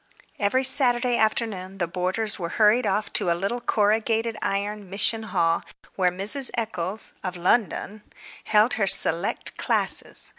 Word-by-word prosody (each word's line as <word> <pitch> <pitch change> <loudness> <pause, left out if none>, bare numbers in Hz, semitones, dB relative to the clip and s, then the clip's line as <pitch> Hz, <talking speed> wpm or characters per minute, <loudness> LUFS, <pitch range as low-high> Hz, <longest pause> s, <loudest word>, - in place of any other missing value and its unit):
Every 220 +6 0
Saturday 250 -2 +5
afternoon 215 -4 -2
the 175 - -2
boarders 185 +5 -2
were 170 -2 -5
hurried 220 +2 +2
off 205 +2 -3
to - - +2
a 170 - 0
little 200 +7 -4
corrugated 225 +1 -1
iron 200 0 -4
mission 210 +3 -1
hall 170 -6 -1 0.3
where 185 -2 +1
Miss 205 +9 0
Eccles 205 -3 -5
(of 180 -1 -6
London) 205 +2 -2 0.4
held 215 +4 +2
her 195 - +1
"select" 170 0 +3
classes. - - +3
210 Hz, 140 wpm, -23 LUFS, 185-225 Hz, 0.4 s, Saturday